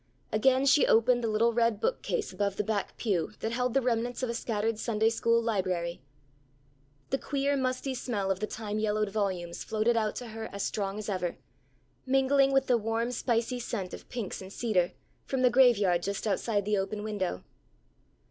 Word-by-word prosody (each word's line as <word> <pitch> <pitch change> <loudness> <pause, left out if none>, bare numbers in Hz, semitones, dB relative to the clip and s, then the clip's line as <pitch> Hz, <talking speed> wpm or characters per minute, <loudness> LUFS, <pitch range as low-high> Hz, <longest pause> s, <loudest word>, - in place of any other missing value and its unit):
Again 260 +5 +3
she 275 +1 +5
opened 240 +2 +4
the - - +1
little 225 +2 +2
red 230 -2 +2
book - - 0
case 475 -3 -2
above 200 -1 -1
the 210 - -1
back 210 -1 -2
pew, 190 -8 -1
that 225 - -1
held 250 +1 -1
the 270 - +3
remnants 240 +1 -1
of 245 - 0
a - - -3
scattered 225 -1 -1
Sunday 225 -1 +1
school 230 0 +2
library. 185 - -1 1.1
The 270 - +1
queer 280 0 0
musty 260 0 -1
smell 215 -6 -2
of 190 - -1
the 215 - -2
time 215 -1 -4
yellowed 215 -1 0
volumes 185 -5 -2
floated 220 +2 +1
out 215 -2 0
to 245 -2 -6
her 220 0 -6
as 200 - -4
strong 200 -1 -2
as 215 - -5
ever, 180 -4 -2 0.7
mingling 270 +1 +4
with 270 0 +3
the 245 -3 +3
warm 225 +2 -1
spicy 240 0 0
scent 210 -6 -4
of - - -10
pinks 230 -7 -4
and 190 0 -9
cedar, 190 -6 0 0.3
from 265 -1 0
the 250 - +5
graveyard 210 -9 +4
just 200 +3 -3
outside 205 0 0
the 210 -1 +1
open 205 +2 -3
window. 200 - -3
225 Hz, 185 wpm, -29 LUFS, 205-245 Hz, 1.1 s, she